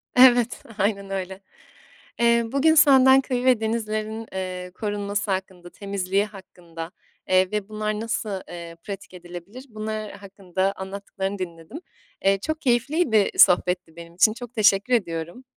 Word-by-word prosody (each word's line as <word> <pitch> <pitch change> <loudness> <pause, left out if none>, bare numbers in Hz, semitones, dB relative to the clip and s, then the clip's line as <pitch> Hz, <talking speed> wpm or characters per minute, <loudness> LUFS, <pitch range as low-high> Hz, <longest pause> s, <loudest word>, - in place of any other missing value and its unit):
Evet, 245 -1 +5
aynen 200 -1 -1
öyle. 190 -1 -4 0.8
Eee, 235 0 +4
bugün 300 +4 +3
senden 270 -3 +7
köyü 255 -2 -2
ve 255 -3 +4
denizlerin, 220 0 -3
eee, 185 -1 -5
korunması 205 +1 -3
hakkında, 185 -2 -4
temizliği 200 0 -1
hakkında, 175 -5 -10 0.4
eee, 185 0 +3
ve 210 -1 -3
bunlar 215 0 -2
nasıl, 215 -3 -3
eee, 170 -1 -8
pratik 200 -2 -8
edilebilir, 180 +7 -10
bunlar 215 -1 -5
hakkında 195 -1 -3
anlattıklarını 195 0 -5
dinledim. 170 - -7 0.5
Eee, 195 0 +4
çok 315 +9 -4
keyifliydi, 245 - +2
sohbetti 180 -2 +4
benim 170 0 -11
için. 215 +4 +4
Çok 245 +1 -10
teşekkür 215 +1 +3
ediyorum. 175 +2 -2
200 Hz, 130 wpm, -24 LUFS, 185-230 Hz, 0.8 s, senden